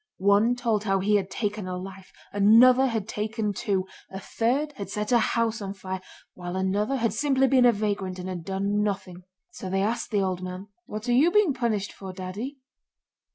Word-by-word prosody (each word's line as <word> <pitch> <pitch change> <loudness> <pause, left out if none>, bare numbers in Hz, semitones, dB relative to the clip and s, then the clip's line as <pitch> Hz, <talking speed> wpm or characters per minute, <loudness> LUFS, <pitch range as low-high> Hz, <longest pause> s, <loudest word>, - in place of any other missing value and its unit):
One 200 +5 +3
told 225 -4 -1
how 195 -1 +2
he 210 +2 +2
had 195 -1 -3
taken 210 -1 -3
a 180 0 -3
life, 190 +1 -9 0.2
another 240 +6 +6
had 225 -5 -2
taken 215 -1 -2
two, 195 -2 -1 0.2
a 190 - -7
third 255 +9 -1
had 200 - -6
set 210 +2 -3
a 240 - +5
house 230 0 0
on 195 0 -5
fire, 190 -1 -5 0.3
while 175 0 -6
another 200 +6 0
had 230 -3 0
simply 270 -2 +2
been 260 -2 +4
a - - +7
vagrant 200 -3 -2
and 180 0 -6
had 180 -3 -5
done 200 +3 -1
nothing. 190 -3 -3 0.3
So 190 - -7
they 195 +1 +1
asked 225 +4 -1
the 205 -4 +1
old 185 -1 -2
man: 185 +2 -7 0.2
'What 215 +3 -6
are 245 - +2
you 285 +8 +5
being 405 -5 +3
punished 225 -6 -1
for, 190 -1 -8
Daddy? 200 +10 -6
205 Hz, 200 wpm, -26 LUFS, 190-235 Hz, 0.3 s, a